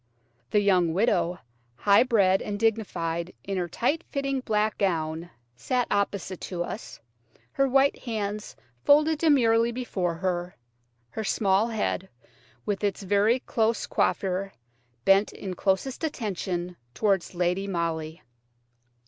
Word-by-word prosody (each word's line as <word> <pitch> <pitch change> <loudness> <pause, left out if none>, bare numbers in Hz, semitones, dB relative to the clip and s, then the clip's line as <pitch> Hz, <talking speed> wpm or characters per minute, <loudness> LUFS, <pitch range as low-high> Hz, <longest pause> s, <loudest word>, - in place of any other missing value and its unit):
The 210 - +3
young 180 -5 +3
widow, 185 -4 +2 0.4
high 200 +11 +5
bred 200 -6 +3
and 205 -1 -4
dignified 180 -6 -1
in 195 -1 -3
her 175 -1 -1
tight 285 - -1
fitting 275 -1 -1
black 215 -3 0
gown, 165 -3 -1 0.3
sat 245 - 0
opposite 200 -2 -1
to 175 -2 -3
us, 210 - -7 0.5
her 275 - +2
white 270 +2 +3
hands 210 -3 -4 0.3
folded 300 +2 +4
demurely 235 -7 +4
before 195 -8 -2
her, 180 0 -2 0.6
her 220 - -4
small 200 +1 +2
head, 210 -4 -2 0.6
with 205 0 -2
its 200 0 -1
very 205 +6 +2
close 225 0 0
coiffure, 195 +1 0 0.5
bent 195 +2 +4
in 190 -2 -6
closest 195 - -1
attention 185 - -3 0.2
towards 195 0 0
Lady 180 +3 0
Molly. 165 -3 -3
200 Hz, 125 wpm, -26 LUFS, 180-230 Hz, 0.6 s, high